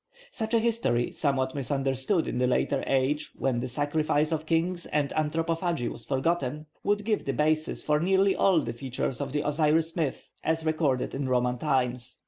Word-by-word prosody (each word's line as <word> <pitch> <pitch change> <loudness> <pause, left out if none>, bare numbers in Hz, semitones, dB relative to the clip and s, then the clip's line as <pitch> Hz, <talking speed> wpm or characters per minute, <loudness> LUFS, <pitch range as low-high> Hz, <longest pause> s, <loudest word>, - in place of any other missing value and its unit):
Such 220 +1 -2
a - - +5
history, 220 - +1
somewhat 130 -3 0
misunderstood 135 - 0
in 125 - -2
a 125 - +3
later 135 +2 +1
age 135 +3 +1
when 130 -3 0
the 130 - -2
sacrifice 150 +3 0
of 160 -1 -2
kings 170 +1 0
and 145 -2 0
anthropophagy 165 -2 -1
was - - -8
forgotten, 150 +1 -1 0.2
would 205 0 +1
give 215 -2 +1
the 135 - -2
basis 155 +3 0
for 150 0 +2
nearly 190 +3 +3
all 185 -5 +4
the - - -4
features 130 0 -3
of - - -3
the 150 +1 -1
Osiris 155 +2 +2
myth 155 -6 -2 0.2
as 160 0 0
recorded 155 -5 0
in 135 -1 -2
Roman 125 -1 +1
times. 125 -4 -1
150 Hz, 175 wpm, -28 LUFS, 130-165 Hz, 0.2 s, a